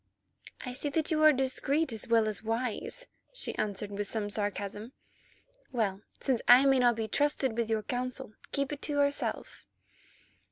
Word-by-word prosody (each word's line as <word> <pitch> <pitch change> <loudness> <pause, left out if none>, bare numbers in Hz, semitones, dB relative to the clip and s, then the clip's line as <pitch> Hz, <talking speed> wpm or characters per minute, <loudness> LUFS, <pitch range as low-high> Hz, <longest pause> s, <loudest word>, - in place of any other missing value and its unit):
"I 250 - -4
see 285 +3 -1
that 315 +3 0
you 310 -1 +2
are 310 0 +8
discreet 270 +2 0
as 220 - -5
well 230 -2 +4
as 215 -2 -3
wise," 240 - -3 0.3
she - - -2
replied 205 -1 -2
with 205 0 -4
some 210 -2 -2
sarcasm. 205 +2 -3 0.8
"Well, 210 -5 -1 0.2
since 260 -4 0
I 250 +3 +8
may 270 -1 +5
not 240 -1 +4
be 220 -1 -2
trusted 275 -1 +1
with 230 -1 -1
your 220 -1 0
counsel, 250 -1 -4 0.2
keep 280 0 -1
it 285 - -7
to 295 - -2
yourself." 285 0 -1
245 Hz, 165 wpm, -30 LUFS, 215-280 Hz, 0.8 s, are